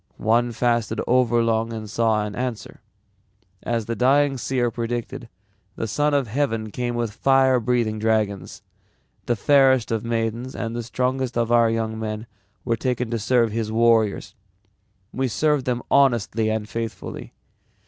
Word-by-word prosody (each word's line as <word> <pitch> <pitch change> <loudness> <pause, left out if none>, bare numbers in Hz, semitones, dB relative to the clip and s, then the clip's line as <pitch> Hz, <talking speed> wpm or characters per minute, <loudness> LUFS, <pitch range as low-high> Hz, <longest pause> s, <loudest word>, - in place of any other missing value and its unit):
One 120 +2 +2
fasted 120 -1 0
overlong 115 -2 +2
and 110 -1 -6
saw 110 -1 +1
an 105 -1 -6
answer. 125 -2 -5 0.8
As 115 -2 -2
the 115 +1 -3
dying 140 +3 +3
seer 125 -1 -1
predicted 120 0 -4 0.5
the 115 - -3
Son 145 +7 +1
of 140 -3 +1
Heaven 115 -3 -2
came 120 +2 -3
with 115 -3 -2
fire 135 +1 +3
breathing 115 -2 0
dragons. 110 -3 -1 0.6
The 120 - +2
fairest 130 0 +3
of 110 -2 -1
maidens 115 +2 -2
and 115 0 -4
the 120 - -2
strongest 125 +1 -2
of 115 0 0
our 115 -1 +5
young 110 -1 -2
men 110 0 -4 0.4
were 115 -2 +1
taken 125 -1 -2
to 115 - -1
serve 115 +1 +2
his 110 0 -3
warriors. 115 -2 +2 0.8
We 130 0 0
served 150 +3 +1
them 125 -1 -1
honestly 115 -5 +2
and 110 -1 -2
faithfully. 115 0 -6
115 Hz, 150 wpm, -23 LUFS, 110-125 Hz, 0.8 s, our